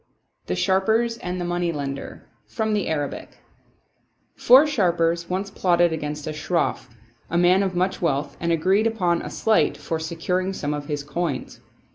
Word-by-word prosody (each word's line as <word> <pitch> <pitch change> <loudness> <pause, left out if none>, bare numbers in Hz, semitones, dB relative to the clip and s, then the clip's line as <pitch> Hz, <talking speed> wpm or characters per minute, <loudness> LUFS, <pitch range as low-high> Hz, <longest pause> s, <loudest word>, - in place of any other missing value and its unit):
The 90 - -1
Sharpers 220 - +1
and 180 +1 -4
the 175 - -2
Moneylender 165 -6 -3 0.2
From 220 -2 -2
the 210 - 0
Arabic 145 -3 -4 1.0
J70UR 265 +5 +7
sharpers 170 - +1
once 195 +2 -2
plotted 175 -3 +2
against 150 -1 -4
a 155 - -4
Shroff, 150 -4 -1 0.4
a 170 - 0
man 180 +2 +4
of 190 -2 -1
much 185 +2 0
wealth, 145 -4 -1
and 170 0 -1
agreed 190 +7 +2
upon 180 -7 0
a - - -6
sleight 220 -1 +1
for 160 - -3
securing 180 +4 -2
some 150 -5 -3
of 145 -1 -5
his 145 -1 -3
coins. 150 -2 -4
175 Hz, 155 wpm, -23 LUFS, 160-190 Hz, 1.0 s, J70UR